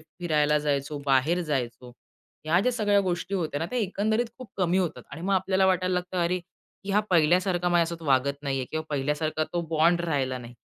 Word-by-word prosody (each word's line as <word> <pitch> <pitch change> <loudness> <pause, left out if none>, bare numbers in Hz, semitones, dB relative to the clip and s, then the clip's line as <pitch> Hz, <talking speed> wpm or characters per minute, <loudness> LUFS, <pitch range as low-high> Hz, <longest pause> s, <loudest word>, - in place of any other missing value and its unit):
फिरायला 155 -2 0
जायचो, 145 0 -1
बाहेर 140 +6 +3
जायचो, 125 -5 -3 0.5
ह्या 165 +3 +3
ज्या 250 +5 +1
सगळ्या 205 -4 +2
गोष्टी 185 0 -2
होत्या 160 -6 -1
ना, 165 - -1
त्या 250 - -1
एकंदरीत 220 +3 0
खूप 255 -4 -9
कमी 185 -1 +2
होतात. 175 -4 -2
आणि 150 - -8
मग 195 +2 +1
आपल्याला 190 0 +2
वाटायला 185 0 +1
लागतं, 180 0 -2
अरे, 180 +2 0 0.5
की 200 - -4
हा 205 +2 +4
पहिल्यासारखा 175 +2 +3
माझ्यासोबत 170 -1 +1
असा 160 - -8
वागत 140 +2 +2
नाहीये 135 -2 -1
किंवा 155 0 -3
पहिल्यासारखा 150 +2 -1
तो 175 - 0
बॉन्ड 165 +2 +3
राहिला 140 -6 -1
नाही. 120 0 -11
170 Hz, 190 wpm, -26 LUFS, 150-185 Hz, 0.5 s, हा